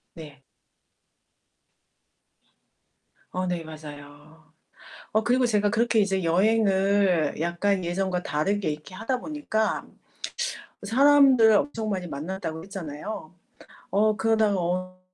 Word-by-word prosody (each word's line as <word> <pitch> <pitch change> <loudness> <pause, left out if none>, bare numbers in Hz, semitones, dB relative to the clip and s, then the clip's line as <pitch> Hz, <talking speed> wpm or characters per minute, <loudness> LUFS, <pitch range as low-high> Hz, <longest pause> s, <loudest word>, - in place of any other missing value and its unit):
네. 150 -4 -11 2.9
어 185 0 -2
네 175 -2 -2
맞아요. 150 0 -12 0.6
어 220 - +2
그리고 250 +1 +2
제가 210 -2 +2
그렇게 235 +1 +1
이제 195 -2 +1
여행을 195 -2 +2
약간 175 +3 0
예전과 180 +1 -1
다르게 195 +5 -1
이렇게 150 +5 -7
하다 240 +6 -2
보니까 295 -8 -2 1.0
사람들 265 -1 +6
엄청 220 0 0
많이 185 -3 -2
만났다고 160 +2 -5
했잖아요. 180 -1 -7 0.6
어 210 +2 +2
그러다가 220 -2 +2
어 185 +1 -3
190 Hz, 225 characters per minute, -25 LUFS, 165-220 Hz, 2.9 s, 사람들